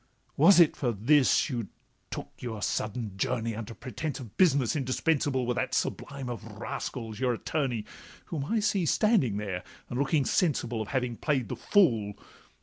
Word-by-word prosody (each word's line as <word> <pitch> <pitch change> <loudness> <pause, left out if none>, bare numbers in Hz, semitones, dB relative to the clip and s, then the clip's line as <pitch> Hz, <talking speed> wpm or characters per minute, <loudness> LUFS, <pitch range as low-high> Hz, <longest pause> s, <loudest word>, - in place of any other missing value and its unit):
'Was 175 +6 +7
it 170 -3 +6
for 125 -4 0
this 130 +6 +3
you 120 -7 -3 0.4
took - - -6
your 110 -4 -5
sudden 110 -2 -2
journey. 115 +1 -1
Under 115 +1 -6
pretence 140 +4 -5
of 115 -6 -10
business 140 -9 +3
indispensable 135 -1 0
With 125 0 -1
that - - -1
sublime 135 -2 -2
of 120 -4 -5
rascals 110 -3 -5
your 125 -2 +2
attorney, 125 -3 -2 0.4
Whom 145 -4 -4
I 220 +7 0
see 195 -5 +1
standing 165 - +3
there, 100 -4 -3 0.3
and 120 - -3
looking 140 0 +2
sensible 125 -9 +1
Of 110 - -4
having 125 -2 -1
play'd 135 -8 0
the - - -3
fool? 115 - +3
125 Hz, 160 wpm, -29 LUFS, 115-150 Hz, 0.4 s, Was